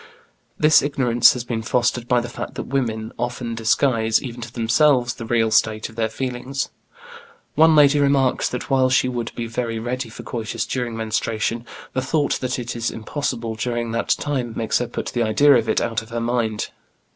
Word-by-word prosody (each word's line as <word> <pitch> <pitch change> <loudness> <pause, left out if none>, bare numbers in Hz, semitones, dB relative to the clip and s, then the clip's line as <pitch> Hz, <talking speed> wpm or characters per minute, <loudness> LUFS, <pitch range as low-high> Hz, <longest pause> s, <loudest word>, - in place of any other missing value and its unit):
This 155 0 +6
ignorance 125 -4 +4
has 125 - -4
been 120 -2 -3
fostered 120 +1 0
by 125 -1 +3
the 120 - -5
fact 120 - -7
that - - -4
women, 115 -5 -2
often 120 -1 -3
disguise 115 0 +2
even 120 -2 -7
to 115 0 -7
themselves 120 +2 +2
the 115 - -8
real 115 -1 +2
state 110 0 +2
of 110 - -15
their 115 -1 0
feelings. 130 +3 -3 0.8
One 160 0 +5
lady 145 -1 +6
remarks 140 -2 +2
that 125 - -5
while 130 -1 +4
she 130 0 +3
would 120 -2 -3
be 120 - -3
very 115 0 -3
ready 120 +1 -3
for 110 - -10
coitus 115 -3 -3
during 120 -3 -3
menstruation, 110 +1 -2 0.3
the 130 - 0
thought 145 +3 0
that 130 0 -2
it 120 -1 -5
is 115 0 -1
impossible 115 -1 -3
during 120 +1 -2
that 115 +1 -2
time 130 -5 -1
makes 115 - +1
her 125 - -2
put 120 - -4
the 120 - -2
idea 115 +6 +5
of 115 -3 +2
it - - +2
out 115 -1 -1
of 110 - -14
her 115 0 -3
mind. 115 -2 -1
120 Hz, 190 wpm, -22 LUFS, 115-130 Hz, 0.8 s, This